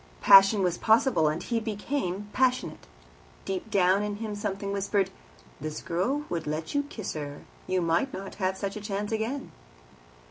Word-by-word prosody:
Passion 195 +1 +8
was 175 -1 0
possible, 220 - +4
and 155 +3 -1
he 235 -2 -1
became 210 -2 -3
passionate. 255 - 0 0.6
Deep 195 +3 -4
down 195 -1 +3
in 210 0 -2
him 215 0 -5
something 200 -1 -3
whispered, 200 0 0 0.5
"This 155 +1 -5
girl 240 +13 -1
would 165 -3 -3
let 155 +2 -3
you 285 - +2
kiss 215 -4 -5
her; 145 -2 -6 0.2
you 185 -1 +1
might 170 +11 +1
not 195 +1 -7
have 190 0 0
such 200 +1 -3
a 210 - -6
chance 205 0 -3
again." 225 +5 -3
200 Hz, 165 wpm, -28 LUFS, 180-220 Hz, 0.6 s, Passion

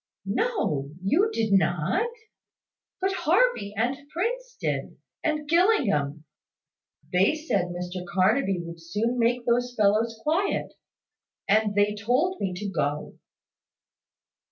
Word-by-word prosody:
"No; 195 - -1
you 350 - +3
did 220 - 0
not: 185 - +2 0.9
but 385 +1 0
Harvey 355 - +2
and 240 +5 +1
Prince - - -3
did, - - -3 0.3
and 305 -2 -1
Gillingham. 205 - +2 0.9
They 190 +11 +4
said 300 - 0
Mr 180 +1 -5
Carnaby 190 +1 +2
would 170 0 -9
soon 215 +9 -1
make 235 +1 +1
those 245 +1 +1
fellows 220 +2 +2
quiet; 345 +6 0 0.7
and 210 0 +3
they 205 0 +3
told 250 - 0
me 190 - 0
to 200 +3 -4
go." 150 -5 -2
220 Hz, 110 wpm, -26 LUFS, 185-315 Hz, 0.9 s, They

